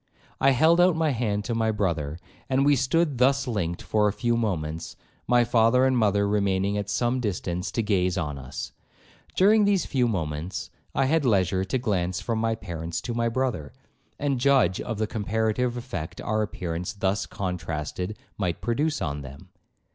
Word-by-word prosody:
I 135 - +5
held 160 +6 +5
out 180 -1 +5
my 160 -2 +1
hand 105 -5 -1
to 120 - -2
my 115 -1 +1
brother, 85 -8 -1 0.3
and 135 +1 +2
we 145 0 +5
stood 145 0 +1
thus 135 +2 +3
linked 90 -8 -2
for 105 -1 +2
a - - +2
few 120 +3 0
moments, 85 -7 -2 0.3
my 120 -1 +5
father 120 +2 +4
and 130 -1 +3
mother 100 -3 +2
remaining 100 -1 +1
at 100 -1 -3
some 120 +4 +1
distance 90 -5 -2
to 115 - -1
gaze 95 -3 +1
on 75 -5 -3
us; 65 0 -6 0.6
during 210 +3 +5
these 200 -3 +2
few 125 -3 +1
moments, 85 -2 -3 0.2
I 135 - +3
had 155 +3 +2
leisure 95 -5 +2
to 95 +8 -1
glance 95 -7 -1
from 115 -2 -2
my 115 0 +1
parents 85 -5 -5
to 120 - -4
my 115 0 +1
brother, 115 - -2 0.4
and 140 -3 0
judge 135 -7 +3
of 115 -3 -4
the 110 - 0
comparative 110 +3 -1
effect 95 -8 -6
our 110 0 -1
appearance 90 -4 -3
thus 100 0 -1
contrasted 90 +1 -4 0.2
might 90 -4 -1
produce 150 +7 0
on 75 -2 -3
them. 70 0 -11
105 Hz, 175 wpm, -26 LUFS, 90-125 Hz, 0.6 s, I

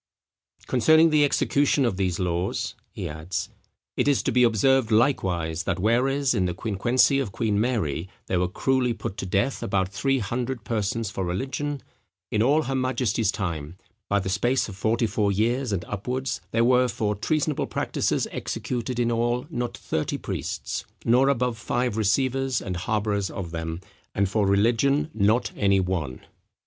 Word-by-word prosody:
"Concerning 160 +6 +5
the 150 -1 +5
execution 140 -1 +2
of 115 - 0
these 90 -3 0
laws," 90 0 -1 0.2
he - - -5
adds, 80 +2 -4 0.5
"it - - +1
is 140 -2 +3
to - - 0
be 125 - +3
observed 120 +1 +3
likewise, 95 - +1
that 95 0 -1
whereas 125 +7 +2
in 95 -6 +1
the 90 -1 -2
quinquencey 120 +7 +2
of 115 -7 -4
Queen 105 -1 0
Mary, 95 - -1 0.2
there 90 - 0
were 90 - +1
cruelly 125 +5 +1
put 115 -3 -5
to 95 - -4
death 100 +8 0
about 95 -1 0
three 135 +7 0
hundred 120 +2 -3
persons 110 -1 -2
for 95 - -3
religion: 135 +10 -3 0.5
in 105 - +1
all 145 +7 +3
her 135 - -3
majesty's 125 -5 +1
time, 85 -5 -4 0.3
by 100 - +3
the 95 - -4
space 120 +7 +1
of 100 - -8
forty 115 +4 +1
four 105 -1 +1
years 120 +5 0
and 95 -3 -2
upwards, 125 +6 -3
there 115 +1 +2
were 125 +1 +4
for 110 -3 -1
treasonable 150 - -1
practices - - -1
executed 125 0 -3
in 120 -1 +2
all 120 +1 0
not 120 -2 -3
thirty 80 -7 -2
priests, - - -4 0.2
nor 125 +4 +4
above 125 -3 0
five 120 -2 -1
receivers 130 +4 +1
and 95 -2 -4
harbourers 100 +1 -1
of 90 -4 -6
them; 80 0 -4 0.4
and 100 0 +2
for 105 0 +1
religion 120 +9 +2
not 110 +3 +2
any 100 -2 +3
one." 90 -9 -2
115 Hz, 165 wpm, -25 LUFS, 95-130 Hz, 0.5 s, Concerning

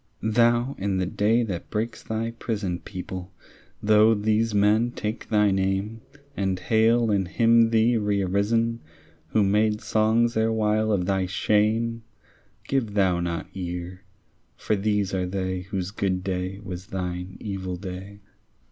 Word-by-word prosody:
Thou, 120 +3 +3
in 95 0 -1
the 95 - 0
day 105 +5 +2
that 95 -6 -5
breaks 110 +2 -3
thy 110 +1 -3
prison, 100 -6 -3
People, 95 -1 -7 0.5
though 110 +1 +5
these 110 +2 +1
men 105 +3 +3
take 110 -1 -5
thy 105 -2 +3
name, 95 +3 -1 0.3
And 95 -2 -1
hail 115 +2 +2
and 95 -3 +1
hymn 115 +3 +4
thee 115 +1 +3
rearisen, 105 +3 +1 0.5
Who 110 - +2
made 105 +2 +2
songs 115 +2 +2
erewhile 110 -1 +1
of 95 -4 +1
thy 95 -1 0
shame, 110 +4 +1 0.7
Give 115 -7 -1
thou 95 -3 +3
not 85 -1 -2
ear; 90 0 -5 0.6
for 110 - 0
these 105 -1 0
are 90 -1 0
they 95 0 -2
Whose 95 -1 -3
good 95 -3 -1
day 95 0 -3
was 90 0 -7
thine 90 -2 -5
evil 95 -3 -4
day. 95 +2 -8
105 Hz, 140 wpm, -25 LUFS, 95-110 Hz, 0.7 s, though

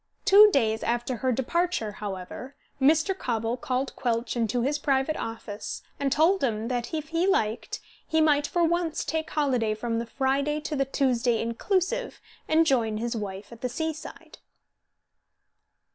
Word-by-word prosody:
Two 420 +1 +9
days 225 - +1
after 240 +1 -1
her 260 +3 0
departure, 265 -1 0
however, 205 +6 -7 0.3
Mr. 320 +7 +4
Cobble 230 - -1
called 255 +1 -2
Quelch 235 -1 -1
into 235 0 0
his 290 +3 0
private 275 +1 +1
office 225 -2 -6 0.2
and 275 -1 0
told 330 +6 +3
him 225 -2 -1
that 245 -2 -2
if 310 -1 -4
he 335 +3 +1
liked 225 - 0 0.3
he 320 - +1
might 295 -2 +3
for 345 -1 +1
once 335 -1 0
take 320 0 -2
holiday 250 -8 +1
from 230 +1 -2
the 235 - -4
Friday 275 +4 0
to 305 0 -3
the 275 -1 +1
Tuesday 250 -3 +1
inclusive, 375 - -1 0.3
and 320 +1 +4
join 230 -7 +1
his 235 +2 -2
wife 200 -1 -6
at 235 0 -12
the 250 - -1
seaside. 315 +3 -6
265 Hz, 155 wpm, -27 LUFS, 230-315 Hz, 0.3 s, Two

